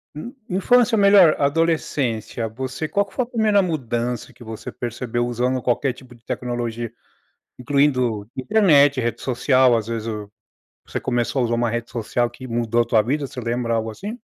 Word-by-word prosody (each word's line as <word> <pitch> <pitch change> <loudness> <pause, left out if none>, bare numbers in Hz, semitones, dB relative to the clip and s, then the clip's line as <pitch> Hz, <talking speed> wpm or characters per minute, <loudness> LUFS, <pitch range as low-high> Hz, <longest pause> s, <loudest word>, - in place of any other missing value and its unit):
in 235 - -7 0.2
infância 225 +5 +3
melhor 200 -5 +6
adolescência, 140 -7 0
você 130 +6 -5
qual 200 +4 +1
que 195 - -20
foi 255 - 0
a - - -7
primeira 220 -4 +2
mudança 125 - -2
que 120 -1 -15
você 110 -1 -7
percebeu 120 0 -3
usando 125 +2 -1
qualquer 130 +2 +1
tipo 125 -1 -14
de 115 - -24
tecnologia? 120 -2 -3 0.7
Incluindo 125 -6 +1
internet, 145 -4 +4
rede 120 -1 -2
social, 130 -1 +3
às 110 - -3
vezes 115 -1 -4
o 105 -2 -5 0.5
você - - -5
começou 120 +1 0
a - - +2
usar 120 - -1
uma 120 -1 +1
rede 120 0 -4
social 120 +1 -1
que 130 +2 -11
mudou 120 0 +1
a - - 0
tua 110 -2 +3
vida, 140 +4 -1
você 130 - -8
lembra 115 0 -1
algo 110 0 -2
assim? 210 - -7
125 Hz, 175 wpm, -22 LUFS, 115-145 Hz, 0.7 s, melhor